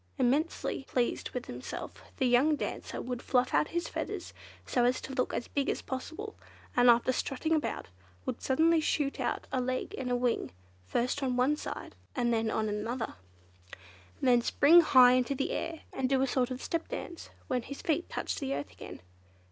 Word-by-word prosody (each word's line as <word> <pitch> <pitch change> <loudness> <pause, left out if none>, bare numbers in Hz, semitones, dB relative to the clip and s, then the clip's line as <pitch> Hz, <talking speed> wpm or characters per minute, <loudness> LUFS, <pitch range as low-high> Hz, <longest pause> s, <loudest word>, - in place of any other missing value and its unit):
Immensely 275 +3 0
pleased 245 -3 -1
with - - -5
himself, - - -7 0.2
the 265 - +1
young 255 +5 +4
dancer - - -4
would 250 -1 -4
fluff 255 0 +1
out - - +3
his 345 0 -2
feathers, - - -5 0.3
so 245 - +1
as 245 +1 +3
to 270 - -7
look 255 -1 0
as - - -3
big 280 -1 -1
as - - -2
possible, 325 +11 -5 0.4
and 245 0 +6
after 235 +2 +5
strutting 275 +5 -1
about, 310 -2 -1 0.4
would - - -3
suddenly 320 +5 +3
shoot 290 -2 0
out - - -1
a 255 - +1
leg 255 +1 -2
and 255 -2 -3
a 245 - +2
wing, 245 -1 0 0.4
first 250 - 0
on 255 -2 0
one 260 +4 +3
side - - -6 0.2
and 240 -2 +1
then 225 -1 +1
on 220 0 0
the 210 +1 -2
other, 240 -2 -3 1.1
then 245 -2 +4
spring 325 +8 +6
high 255 -6 +7
into 255 +2 +2
the 270 - -1
air, 330 -1 -3
and 255 -1 -1
do 270 -1 +3
a - - +4
sort 255 -1 +1
of 255 0 -5
step 335 -1 -2
dance 360 -9 -6 0.2
when 250 -1 0
his 280 +4 -8
feet 330 +2 0
touched - - -3
the 275 -2 -2
earth 145 - -5
again. - - -10
255 Hz, 190 wpm, -31 LUFS, 245-295 Hz, 1.1 s, high